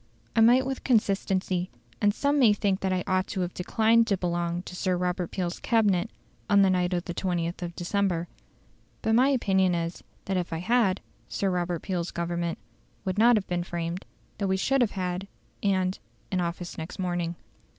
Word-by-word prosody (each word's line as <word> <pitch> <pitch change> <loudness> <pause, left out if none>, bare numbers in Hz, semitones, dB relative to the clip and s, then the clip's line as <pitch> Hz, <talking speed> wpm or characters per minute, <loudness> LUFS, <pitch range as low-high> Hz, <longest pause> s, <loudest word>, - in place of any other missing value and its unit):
I 225 - +5
might 245 +3 +6
with 265 -1 -4
consistency, 195 -5 +1 0.3
and 205 -1 +5
some 285 +6 +1
may 230 -6 +6
think 200 -2 0
that 190 - -1
I 185 -1 0
ought 185 0 +1
to 190 - -3
have 180 0 -2
declined 225 +5 +3
to 200 - +2
belong 175 -1 -1
to 180 - -9
Sir 180 0 0
Robert 180 -1 -1
Peel's 180 -2 -3
Cabinet 215 -4 +2 0.4
on 200 -1 +6
the 190 - +4
night 180 -1 +1
of 175 -1 -1
the 175 - -4
20th 175 -1 -2
of 170 -1 -5
December. 175 -2 0 0.8
But 220 - +2
my 250 +4 +5
opinion 190 -8 +2
is, 170 0 -3 0.2
that 190 -1 0
if 180 -1 -2
I 165 - -1
had, 200 +1 +2 0.3
Sir 195 -1 0
Robert 175 -2 -1
Peel's 180 -3 -2
Government 170 0 -2 0.5
would 190 +2 -1
not 240 +2 +7
have 200 - -2
been 175 -1 -1
framed; 175 +1 -4 0.3
that 200 - 0
we 190 0 +1
should 270 +7 +2
have 235 - +2
had 180 +1 -2 0.3
and 190 -2 +1 0.3
in 185 - +1
office 175 0 -4
next 160 +2 -6
morning. 175 -2 -2
185 Hz, 190 wpm, -27 LUFS, 175-205 Hz, 0.8 s, not